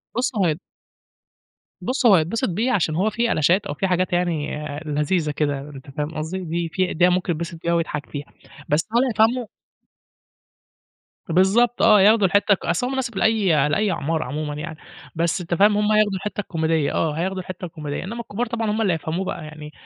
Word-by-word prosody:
بُص، 255 +3 0
هو 195 -4 +2
هي 155 - +2 1.3
بُص، 255 +1 -1
هو 210 -5 +8
هيتبسِط 175 +8 0
بيه 225 +9 0
عشان 160 -6 +1
هو 200 +5 +2
في 235 +2 0
ألشات 180 +7 +2
أو - - -3
في 190 +6 -1
حاجات 180 0 0
يعني 170 -5 -1 0.3
لذيذة 150 +2 0
كده 145 -1 -1
أنت 140 0 -11
فاهم 150 +3 -4
قصدي؟ 160 +5 -3
دي 170 -1 -3
في 185 -1 0
ده 180 +2 +4
ممكن 180 0 0
يتبسِط 165 +1 -6
بيها 170 0 +1
ويضحك 160 -3 -2
فيها. 145 -1 -6 0.4
بس 150 +6 +1
هل 250 - +5
هيفهمه؟ 230 +1 +2 1.8
بالضبط 195 +8 +3
آه. 210 -3 +6
ياخدوا 210 0 +5
الحتّة 205 +2 +3
ك 195 - -4
أصل 175 +9 0
هو - - -3
مناسب 240 -6 -3
لأي 190 -11 +3
لأي 200 +6 +1
أعمار 160 0 -1
عمومًا 150 +3 -4
يعني، 155 +2 -6 0.4
بس 170 +2 0
أنت 175 0 -4
فاهم 205 +4 +4
هم 210 0 +2
هياخدوا 215 -1 +3
الحتّة 210 +2 -4
الكوميدية 160 -5 0
آه 160 -2 0
هياخدوا 185 +4 -2
الحتّة 185 0 -7
الكوميدية، 150 -3 -5
إنّما 230 +5 -5
الكبار 235 +1 -3
طبعًا 225 -2 -2
هم 220 +1 -1
اللي 190 -5 +2
يفهموه 165 +4 -3
بقى 165 - -4
يعني 150 0 -10
180 Hz, 190 wpm, -22 LUFS, 155-210 Hz, 1.8 s, هو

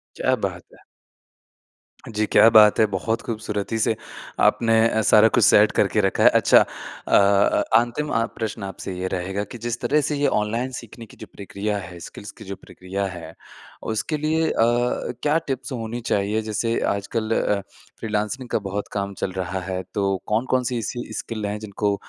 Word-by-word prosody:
क्या - - +1
बात - - -5
है! - - -19 1.3
जी, 110 -1 -1
क्या 110 - +6
बात 105 -2 +6
है, 110 - +6
बहुत 110 +5 -1
खूबसूरती 110 -1 -3
से 110 +1 +1 0.5
आपने 115 -1 +3
अ, 110 -1 0
सारा 110 +1 +6
कुछ - - +4
सेट 105 +1 +6
करके 105 +1 +1
रखा 95 -1 +1
है। - - +9
अच्छा, - - +6 0.5
अ, - - +3
अ, 100 +1 +4
अंतिम 120 +6 -1
अ, 115 0 +2
प्रश्न 110 -1 -4
आपसे 95 0 -6
ये 90 +1 -2
रहेगा 95 +2 -3
कि - - -7
जिस 120 0 -2
तरह 145 +5 +2
से 150 - -1
ये 145 0 +2
ऑनलाइन 115 +5 -2
सीखने 115 0 -12
की - - -18
जो - - -10
प्रक्रिया 105 +1 -3
है, 90 -2 -8
स्किल्स 100 +4 -10
की - - -14
जो 100 +1 -6
प्रक्रिया 95 +1 -6
है। 85 -4 -7 0.6
उसके 150 +8 -2
लिए 160 +2 0
अ, - - -3
क्या 120 +5 +1
टिप्स 130 -1 -4
होनी 120 -1 -4
चाहिए? 105 +2 +1
जैसे 110 +2 -1 0.2
आजकल 110 +2 -3
अ, 105 - +1 0.4
फ़्रीलांसिंग 110 +4 -3
का - - 0
बहुत 100 +1 -4
काम 100 -1 -3
चल 95 - -1
रहा 95 0 -3
है, 95 0 -2
तो 100 -1 0
कौन-कौन-सी 125 +2 0
ऐसी 120 +2 -5
स्किल 110 -2 -5
है, 100 +1 -3
जिनको 105 -1 -2
110 Hz, 180 wpm, -23 LUFS, 100-120 Hz, 1.3 s, है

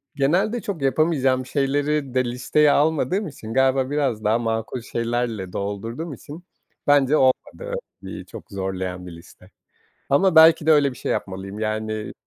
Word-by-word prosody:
Genelde 185 - +1
çok 185 -7 -5
yapamayacağım 135 -3 +1
şeyleri 140 0 -1
de 130 -1 +2
listeye 125 +5 +2
almadığım 160 +6 +1
için, 115 -7 -8
galiba 130 0 +2
biraz 135 -7 -1
daha 110 +3 +2
makul 115 +1 -3
şeylerle 115 -5 -3
doldurduğum 115 +10 -4
için 150 +6 -11 0.4
bence 145 +1 +4
olmadı - - 0 0.3
bir - - -8
çok - - -12
zorlayan 95 -2 -4
bir - - -8
liste. 90 +2 -15 0.6
Ama 170 +5 +3
belki 160 -1 +7
de 160 - +5
öyle 145 -3 +4
bir 125 - -12
şey - - -3
yapmalıyım. 95 +2 -4
Yani, 110 0 -3
130 Hz, 145 wpm, -22 LUFS, 110-150 Hz, 0.6 s, belki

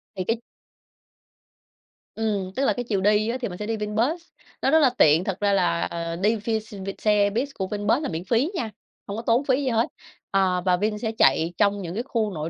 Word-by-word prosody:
Thì 185 - -2
cái 225 +4 0 1.8
Ừm, 205 -4 -1
tức 275 +1 +1
là - - +3
cái 245 - -3
chiều 205 -5 -1
đi 210 +2 +3
á 250 - -1
thì 240 - -1
mình 180 -2 -7
sẽ 210 - -5
đi 225 0 -2
VinBus, 225 +11 -1 0.4
nó - - +2
rất 320 - +6
là 275 -4 +5
tiện. 155 +3 +5
Thật 195 -1 -3
ra 200 -1 +2
là, 85 - +2
ờ, 165 - -3
đi 210 +6 +2
ph 210 - -13 0.4
vin 195 - -4
xe 205 -1 +3
bus 245 +7 -1
của 190 - -1
Vinbus 210 +7 0
là - - -2
miễn 165 +1 -4
phí 245 - +1
nha, 230 -9 -2 0.4
hông 200 +2 -4
có - - -3
tốn 235 +4 +2
phí 270 +1 +2
gì 260 - 0
hết. 230 0 +2 0.4
Ờ, 185 -2 +2
và 180 -1 +3
Vin 210 +2 -1
sẽ 225 0 -2
chạy 160 +6 +3
trong 200 0 +2
những 170 -1 -5
cái 230 - -2
khu 225 -5 -1
nội 155 0 -4
210 Hz, 235 wpm, -24 LUFS, 185-230 Hz, 1.8 s, rất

